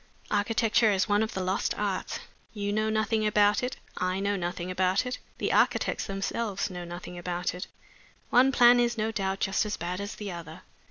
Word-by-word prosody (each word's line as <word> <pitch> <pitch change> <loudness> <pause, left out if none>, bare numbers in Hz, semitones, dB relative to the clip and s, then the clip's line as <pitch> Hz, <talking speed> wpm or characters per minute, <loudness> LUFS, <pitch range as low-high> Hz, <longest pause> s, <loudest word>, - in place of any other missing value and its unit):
"Architecture 225 +2 +3
is 195 +1 +1
one 205 0 +3
of 220 - -2
the 190 - -1
lost 185 +1 0
arts. - - -2 0.4
You 205 -1 -2
know 215 +1 +1
nothing 220 0 +1
about 210 0 +4
it; 250 +1 -3 0.2
I 185 +1 0
know 200 +1 0
nothing 180 0 -3
about 185 +3 +1
it; 250 0 -4 0.2
the - - -1
architects - - +2
themselves 195 +1 -2
know 180 -1 -6
nothing 175 +1 -7
about 175 0 -2
it. 180 +2 -6 0.6
One 260 +2 +6
plan 245 -1 +7
is, 240 -1 +1
no 220 +1 0
doubt, 195 -2 -2
just 195 +1 +2
as 210 -1 -3
bad 180 +3 -3
as 200 - -5
the 205 -2 -5
other. 170 +1 -9
200 Hz, 195 wpm, -28 LUFS, 185-220 Hz, 0.6 s, plan